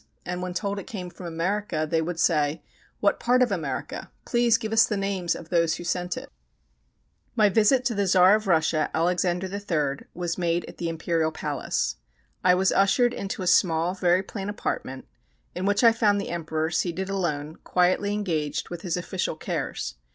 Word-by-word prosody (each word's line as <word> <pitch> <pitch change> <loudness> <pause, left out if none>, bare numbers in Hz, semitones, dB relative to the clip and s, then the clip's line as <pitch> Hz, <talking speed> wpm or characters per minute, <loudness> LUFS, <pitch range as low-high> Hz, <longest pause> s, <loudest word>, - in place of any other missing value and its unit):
And 180 0 -3
when 180 -1 -4
told 200 +1 -2
it 195 - -9
came 180 -5 -6
from 175 0 -9
America, 170 -1 -1
they 160 +1 +1
would 165 +1 -3
say: 155 -2 +1 0.4
"What 200 -1 +2
part 250 +1 +3
of 245 - 0
America? 160 -8 -4 0.2
Please 240 -1 +3
give 220 -2 -4
us 225 - +7
the 210 - -1
names 195 -3 -1
of 165 - -10
those 170 -2 +2
who - - -7
sent 180 +1 -2
it." - - -8 1.0
My 215 -3 +5
visit 230 +5 +3
to 240 - +1
the 200 -2 0
Czar 185 +1 +6
of 215 -1 +1
Russia, 160 -3 +2
Alexander 175 +2 +1
III., 165 -8 -2
was 175 0 -3
made 175 0 0
at - - -12
the 170 - -1
Imperial 165 -1 0
Palace. 145 -4 -2 0.5
I 180 0 +5
was 190 +1 +2
ushered 240 +5 +3
into 195 -3 -4
a - - -3
small, 175 -1 +3
very 180 0 +2
plain 195 0 -6
apartment, 135 -9 -4 0.5
in 185 +2 -2
which 205 +3 +2
I 230 - +8
found 215 -3 +2
the 200 - -4
Emperor 160 -1 -2
seated 180 +2 -1
alone, 160 -6 -2
quietly 185 +3 +2
engaged 170 -8 -2
with 175 -1 -6
his 180 -2 -2
official 180 -2 -2
cares. - - -4
180 Hz, 185 wpm, -25 LUFS, 165-200 Hz, 1.0 s, I